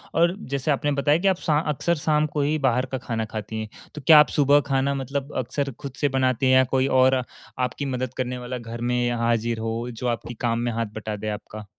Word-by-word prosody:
और 170 +2 +3 0.2
जैसे 140 +2 0
आपने 145 +1 0
बताया 145 +2 +2
कि 195 - +1
आप 190 -2 +3
शा 150 -2 +4
अक्सर 170 +4 0
शाम 150 0 +1
को 150 - +1
ही 150 +2 +1
बाहर 125 +1 +1
का 130 - -1
खाना 115 -2 -3
खाती 110 0 -5
हैं। 110 - -6 0.3
तो 150 - -6
क्या 155 -2 +10
आप 150 - +6
सुबह 145 0 +5
खाना 135 +1 +1
मतलब 140 +1 -4
अक्सर 140 +3 -2
खुद 140 -3 -7
से 145 - +3
बनाती 130 -1 +1
हैं? 130 - +4
या 130 - +6
कोई 130 +1 +1
और 130 0 +4 0.4
आपकी 125 +3 -2
मदद 130 -2 -3
करने 125 0 -2
वाला 125 +1 -5
घर 115 0 -8
में 125 0 +1
हाज़िर 115 -1 0
हो 115 +2 -3
जो 120 +2 -4
आपकी 120 0 -3
काम 115 0 0
में 120 0 -1
हाथ 115 0 -1
बटा 110 -1 -4
दे 105 +1 -4
आपका? 105 0 -7
130 Hz, 235 wpm, -24 LUFS, 115-140 Hz, 0.4 s, क्या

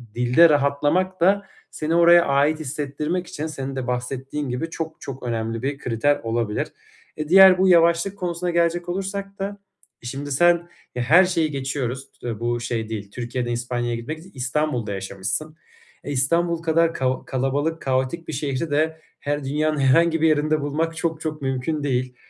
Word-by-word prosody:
dilde 125 +8 +5
rahatlamak 150 +6 +1
da 200 +3 +4 0.3
seni 155 +2 -2
oraya 170 0 +6
ait 140 +3 +2
hissettirmek 150 +4 -3
için 155 -3 -5
senin 135 -3 -5
de 130 -2 -4
bahsettiğin 130 +3 -3
gibi 125 +7 -3
çok, 160 -1 -6
çok 135 -1 -7
önemli 115 -1 -2
bir 135 +2 -2
kriter 130 +2 0
olabilir. 115 -2 -1 0.5
E, 150 -1 -4
diğer 190 0 +8
bu 190 +1 +3
yavaşlık 170 +2 +4
konusuna 180 -1 -2
gelecek 170 0 +1
olursak 195 +2 -4
da 200 +1 -4 0.5
şimdi 140 +4 -5
sen, 175 +4 +3 0.3
e 125 - -1
her 170 +10 +6
şeyi 165 -4 0
geçiyoruz 135 -1 -3
s 115 -3 -4
bu 120 0 -1
şey 115 -2 -3
değil, 105 -3 -6
Türkiye'den 120 +1 -3
İspanya'ya 120 0 -2
gitmek 125 +7 -5 0.2
İstanbul'da 125 -4 -1
yaşamışsın. 95 +9 -4 0.5
E, 145 - -5
İstanbul 170 +5 +1
kadar 165 0 +2
kao 130 -3 -1
kalabalık 140 +5 -1
kaotik 130 +5 -1
bir - - -5
şehri 140 +3 -2
de 160 +2 0 0.2
her 145 0 -2
dünyanın 150 +3 0
herhangi 165 +5 +3
bir 160 - +5
yerinde 155 0 +2
bulmak 160 +3 -1
çok, 160 -1 -2
çok 155 -2 -4
mümkün 135 +3 -2
değil. 130 -2 -1
145 Hz, 160 wpm, -23 LUFS, 125-165 Hz, 0.5 s, diğer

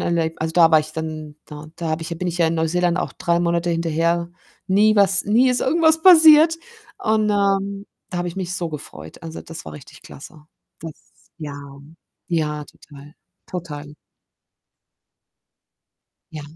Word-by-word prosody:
Erleb 165 -1 -1
also, 160 0 -2
da 165 -1 +5
war 160 - +6
ich 155 0 -5
dann 155 -2 -6
da 150 0 -10
da 170 -2 -4
habe 155 +1 -2
ich 160 - -7
ja 170 - -4
bin 180 +1 -3
ich 175 - -4
ja 165 -1 +2
Neuseeland 170 +2 0
auch - - -3
3 170 0 0
Monate 170 0 0
hinterher. 170 +1 -1 0.4
Nie 210 +3 +3
was 200 -1 +3
nie 235 +5 +3
ist 250 - 0
irgendwas 320 +2 +2
passiert 320 -2 +7 0.4
und, 215 -1 +1
ähm, 200 0 0 0.2
da 180 - -4
habe 175 0 -2
ich 170 - -9
mich 180 -1 -4
so 170 -2 -3
gefreut. 80 - -10
Also, 165 -1 -8
das 165 0 -10
war - - -9
richtig 145 - -14
klasse. 150 +2 -13 0.4
Das 160 -1 -7 0.5
ja, 145 -3 -7 0.7
ja, 150 -3 -2
total, 145 0 -16 0.3
total. 150 -4 -8 2.4
Ja. 155 -2 -8
170 Hz, 160 wpm, -21 LUFS, 155-195 Hz, 2.4 s, passiert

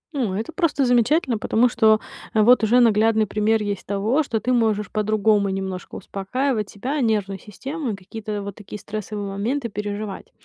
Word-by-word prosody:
О, 230 -9 -1
это 220 +10 -3
просто 315 -6 +1
замечательно, 245 +1 +2
потому 235 +3 +2
что, 220 -2 +4 0.4
э, 215 - +5
вот 245 0 +5
уже 230 +3 +4
наглядный 220 -1 +4
пример 215 +2 +1
есть 205 -2 -3
того, 210 +9 +1
что 230 -6 -2
ты 255 +3 0
можешь 215 -4 +1
по-другому 215 -1 +2
немножко 190 -1 -5
успокаивать 210 +4 -2
себя, 270 +8 -3
нервную 205 -4 0
систему 270 - -6
и - - -3
какие-то 205 +2 -6
вот 200 - -6
такие 210 0 -9
стрессовые 210 -1 -5
моменты 230 +7 -2
переживать. 205 -1 -5
215 Hz, 165 wpm, -22 LUFS, 205-240 Hz, 0.4 s, э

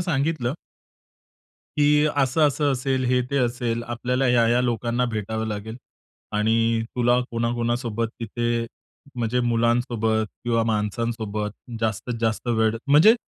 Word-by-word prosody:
सांगितलं. 145 -6 0 1.2
की 150 0 +4
असं, 135 +2 +2
असं 145 0 +1
असेल, 130 0 -1
हे 125 0 +2
ते 140 - 0
असेल, 120 -2 -1
आपल्याला 125 +2 -1
ह्या-ह्या 120 0 +4
लोकांना 120 0 0
भेटावं 110 +1 -2
लागेल 110 +1 -5 0.6
आणि 115 +1 +2
तुला 120 0 +3
कोणा-कोणासोबत 115 -1 -1
तिथे 120 +1 -1 0.5
म्हणजे 120 0 0
मुलांसोबत 115 -2 +1 0.2
किंवा 115 -1 +2
माणसांसोबत 110 -1 -2 0.3
जास्तीत 115 +2 -2
जास्त 115 +1 -1
वेळ 110 -1 +2
म्हणजे 150 +11 +7
120 Hz, 115 wpm, -24 LUFS, 115-125 Hz, 1.2 s, म्हणजे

